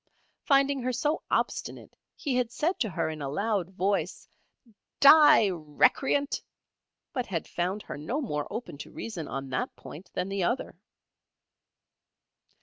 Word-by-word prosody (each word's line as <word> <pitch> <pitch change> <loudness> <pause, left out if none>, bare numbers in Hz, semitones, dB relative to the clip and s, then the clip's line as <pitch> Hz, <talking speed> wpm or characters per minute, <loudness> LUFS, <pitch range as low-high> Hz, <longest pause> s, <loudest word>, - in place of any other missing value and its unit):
Finding 275 -1 +3
her 255 +1 -1
so 295 +6 0
obstinate - - -2 0.2
he 280 - -3
had 245 -2 0
said 330 +8 -1
to 220 - 0
her 170 - -1
in 155 -1 -5
a 140 - -3
loud 200 +3 -1
voice, 190 -2 -1 0.7
"Die, 280 -7 +8
recreant!" 180 - +1 0.7
but 250 -3 -2
had 170 -4 -3
found 185 +4 -2
her - - -7
no 205 - -2
more 150 - -3
open 225 -11 -6
to - - -8
reason 175 -10 -6
on 135 -1 -5
that 125 - -2
point 170 +6 -11
than 180 - -1
the 195 -1 -2
other. 240 +8 -1
205 Hz, 145 wpm, -28 LUFS, 165-265 Hz, 0.7 s, Die